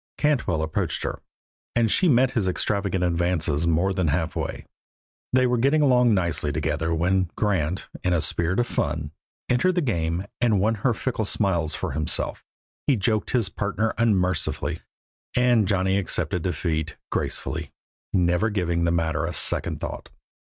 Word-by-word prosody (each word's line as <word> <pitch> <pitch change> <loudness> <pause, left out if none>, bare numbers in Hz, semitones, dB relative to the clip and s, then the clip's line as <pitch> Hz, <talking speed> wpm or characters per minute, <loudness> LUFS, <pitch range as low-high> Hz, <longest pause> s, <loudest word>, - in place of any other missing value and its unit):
Cantwell 120 - +1
approached 80 - -1
her, - - -4 0.5
and 115 -2 +3
she 180 - +3
met 130 -1 +4
his 110 -8 0
extravagant 95 0 -1
advances 85 -3 +1
more 85 +4 +2
than 90 -3 0
halfway. 80 0 -2 0.7
They 130 0 +4
were 125 -1 +1
getting 140 +5 +3
along 125 -4 +4
nicely 85 -5 0
together 80 +2 -1
when 90 +2 +1
Grant, 95 -5 0 0.2
in 90 - +1
a 85 - +3
spirit 85 +5 0
of 120 - +2
fun, 75 -7 -2 0.4
entered 170 +9 +2
the 175 - +2
game 85 - -1 0.2
and 110 -5 +3
won 110 +4 +2
her 120 -2 +2
fickle 115 -2 -2
smiles 85 -7 0
for - - -3
himself. 75 +2 -2 0.4
He 140 - +4
joked 110 0 0
his 115 -6 +1
partner 105 +3 -1
unmercifully, 95 -7 +1 0.6
and 120 -4 +3
Johnny 95 0 +2
accepted 90 -2 -1
defeat 80 -2 -2
gracefully, - - -2 0.4
never 90 +3 +2
giving 85 -5 0
the 85 - +2
matter 80 -1 0
a 85 - -3
second - - 0
thought. - - -6
95 Hz, 150 wpm, -24 LUFS, 85-115 Hz, 0.7 s, met